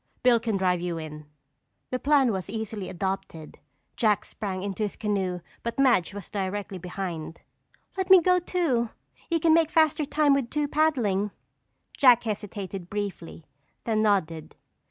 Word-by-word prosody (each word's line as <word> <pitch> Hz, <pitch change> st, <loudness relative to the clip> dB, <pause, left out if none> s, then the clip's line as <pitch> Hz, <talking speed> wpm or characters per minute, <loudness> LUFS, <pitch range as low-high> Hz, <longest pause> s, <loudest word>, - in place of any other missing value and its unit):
Bill 245 Hz, -2 st, +5 dB
can 225 Hz, -3 st, -1 dB
drive 180 Hz, -2 st, +1 dB
you 175 Hz, -1 st, -3 dB
in." 150 Hz, -1 st, -8 dB, 0.6 s
The 255 Hz, -, -1 dB
plan 280 Hz, -4 st, +3 dB
was 190 Hz, -1 st, -4 dB
instantly 220 Hz, -2 st, -4 dB
adopted. 190 Hz, -4 st, -5 dB, 0.4 s
Jack 215 Hz, -3 st, +2 dB
sprang 190 Hz, -3 st, -5 dB
into 200 Hz, +1 st, -4 dB
his 210 Hz, -2 st, -1 dB
canoe 190 Hz, -4 st, -2 dB, 0.2 s
but 235 Hz, 0 st, -4 dB
Madge 235 Hz, -9 st, +3 dB
was 200 Hz, -4 st, -8 dB
directly 195 Hz, -1 st, -3 dB
behind. 175 Hz, -3 st, -5 dB, 0.6 s
"Let 380 Hz, 0 st, -2 dB
me 380 Hz, -1 st, +10 dB
go 360 Hz, +1 st, +3 dB
too! 315 Hz, -10 st, 0 dB, 0.4 s
You 335 Hz, -1 st, +1 dB
can 320 Hz, 0 st, +4 dB
make 325 Hz, -1 st, +4 dB
faster 315 Hz, -2 st, +3 dB
time 295 Hz, 0 st, +3 dB
with 275 Hz, -4 st, 0 dB
two 295 Hz, +1 st, -1 dB
paddling." 245 Hz, -11 st, +1 dB, 0.7 s
Jack 250 Hz, -3 st, +6 dB
hesitated 200 Hz, -4 st, -5 dB
briefly, 200 Hz, -6 st, -5 dB, 0.4 s
then 220 Hz, -2 st, +1 dB
nodded. 170 Hz, -7 st, 0 dB
210 Hz, 150 wpm, -26 LUFS, 185-270 Hz, 0.7 s, me